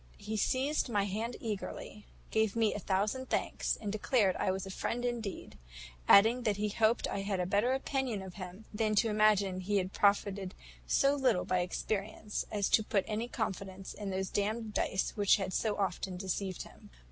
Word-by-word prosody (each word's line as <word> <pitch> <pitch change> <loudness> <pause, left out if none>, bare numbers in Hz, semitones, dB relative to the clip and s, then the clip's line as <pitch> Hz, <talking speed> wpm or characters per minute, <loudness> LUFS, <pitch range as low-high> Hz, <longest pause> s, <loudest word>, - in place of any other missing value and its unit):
He 220 - -5
seized 265 +6 +1
my 205 -4 +2
hand 220 +5 -3
eagerly, 210 -1 -6 0.2
gave 220 -1 +2
me 225 -2 +2
a - - -4
thousand 210 +7 -1
thanks, - - 0
and 205 -2 -3
declared 215 -2 +2
I - - 0
was 190 0 -1
a 195 - -6
friend 245 +5 -2
indeed; 225 - -4 0.5
adding 225 +5 +7
that 215 -4 0
he 210 0 0
hoped 220 +2 +2
I 200 - -3
had 195 -1 -2
a 180 - +1
better 205 +7 +2
opinion 265 -6 -1
of 190 -2 -9
him 185 +3 -9
than 215 0 +1
to 225 +2 +3
imagine 210 -3 +3
he 200 +2 0
had 185 0 -1
profited 200 -2 +1 0.3
so 275 0 +4
little 265 -10 +2
by 185 - +1
experience, 205 +3 -3
as 205 -2 +1
to 220 - +4
put 200 -2 0
any 220 +2 -2
confidence 195 -5 -4
in 205 -2 -5
those 190 0 -2
damned 215 +2 -1
dice 190 - 0
which 205 -3 +5
had 190 -2 -3
so 215 -2 0
often 190 -1 -2
deceived 190 0 -3
him. - - -16
205 Hz, 185 wpm, -32 LUFS, 195-220 Hz, 0.5 s, adding